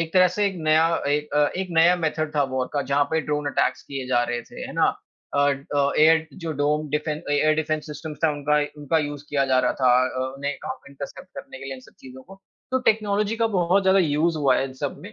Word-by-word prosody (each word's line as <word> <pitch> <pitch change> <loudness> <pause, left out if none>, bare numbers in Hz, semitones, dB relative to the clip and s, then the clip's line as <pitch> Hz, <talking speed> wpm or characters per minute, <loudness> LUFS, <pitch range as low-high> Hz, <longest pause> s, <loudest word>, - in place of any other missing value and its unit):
एक 165 -1 -3
तरह 185 -1 +6
से 205 -1 +2
एक 195 - -2
नया 155 +1 +4 0.2
एक 150 +1 0 0.3
एक 190 - -2
नया 170 +2 +6
मेथड 155 -2 -2
था 145 - +3
वॉर 130 -1 -1
का, 145 -1 0
जहाँ 140 +2 +1
पे 160 0 +1
ड्रोन 150 -1 -2
अटैक्स 145 - 0
किए 135 -2 -6
जा 120 -1 +2
रहे 120 0 -3
थे, - - -12
है - - -9
ना? - - +3 0.5
अ 140 - +3 0.3
अ, 140 0 +2
एट 160 +1 +5 0.2
जो 160 - -2
डोम 150 +1 0
डिफें 150 +1 -1
अ, 150 - -8
एयर 155 +2 +3
डिफेंस 155 0 -2
सिस्टम 150 +1 -7
था, 160 - +4
उनका 145 +1 0 0.2
उनका 150 +3 +1
यूज़ 145 -1 -4
किया 140 -2 +1
जा 130 -1 +3
रहा - - +2
था 130 -1 +5
अ 130 - -1
अ 130 0 -4
उन्हें 140 +1 -3
काफ़ी 140 - -7
इंटरसेप्ट 140 0 -9
करने 130 -1 -10
के 135 - -10
लिए 135 0 -5
इन 130 - -11
सब - - -19
चीज़ों 130 0 -12
को 195 +1 -15 0.3
तो 260 - +2
टेक्नोलॉजी 210 0 -1
का 230 0 +2
बहुत 180 +3 +3
ज़्यादा 190 +1 +4
यूज़ 160 0 +1
हुआ 140 -2 +3
है - - 0
इन 135 - -6
सब 145 - -2
में 205 +3 -10
150 Hz, 250 wpm, -24 LUFS, 140-165 Hz, 0.5 s, तरह